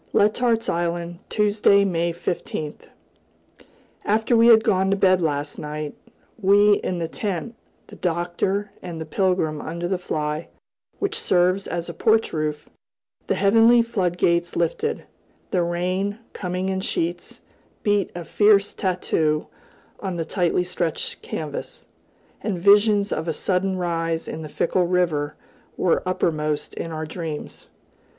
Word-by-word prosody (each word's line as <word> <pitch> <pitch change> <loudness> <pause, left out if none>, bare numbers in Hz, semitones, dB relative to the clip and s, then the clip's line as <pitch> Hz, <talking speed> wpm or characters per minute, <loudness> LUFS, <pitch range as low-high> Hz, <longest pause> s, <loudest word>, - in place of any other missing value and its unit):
Letart's 230 +2 +2
Island, 170 0 -2
Tuesday, 205 -1 +3
May 170 -2 0
15th. 165 -3 -4 1.2
After 220 +3 +2
we 230 0 +6
had 225 -2 +7
gone 190 -1 +2
to 195 - +2
bed 185 -1 +4
last 145 -2 -2
night, 150 0 -5 0.5
we 205 +1 +5
in 180 - -2
the 165 -1 -2
tent, 200 +5 -4 0.3
the - - -13
Doctor 180 +4 -1
and 165 -3 -6
Pilgrim 180 -6 +1
under 170 +2 -4
the 185 0 -1
fly, 150 -2 -3 0.5
which 410 +3 -2
serves 185 - +2
as 170 -1 -3
a 170 - -6
porch 220 +6 +2
roof, 150 -1 -2 0.6
the - - +1
heavenly 225 +4 +5
floodgates 175 -5 0
lifted; 175 - -1 0.5
the 180 - +2
rain, 185 +4 -1 0.2
coming 180 0 -3
in 190 0 -1
sheets, 175 -1 -3 0.4
beat 205 -2 +1
a 175 -1 -6
fierce 205 +1 +4
tattoo 160 -5 0 0.5
on 190 -3 -3
the 165 -1 -2
tightly 180 0 +1
stretched 180 - -3
canvas, - - -6 0.6
and 200 -4 -2
visions 205 +2 +5
of 160 - -2
a 165 - 0
sudden 185 +3 0
rise 165 -2 -1
in 160 - -5
the 155 - -7
fickle 175 +3 +1
river 170 -5 0 0.4
were 175 - +2
uppermost 155 -4 -1
in 165 - -5
our 155 0 -4
dreams. 160 -2 -6
180 Hz, 135 wpm, -23 LUFS, 165-200 Hz, 1.2 s, had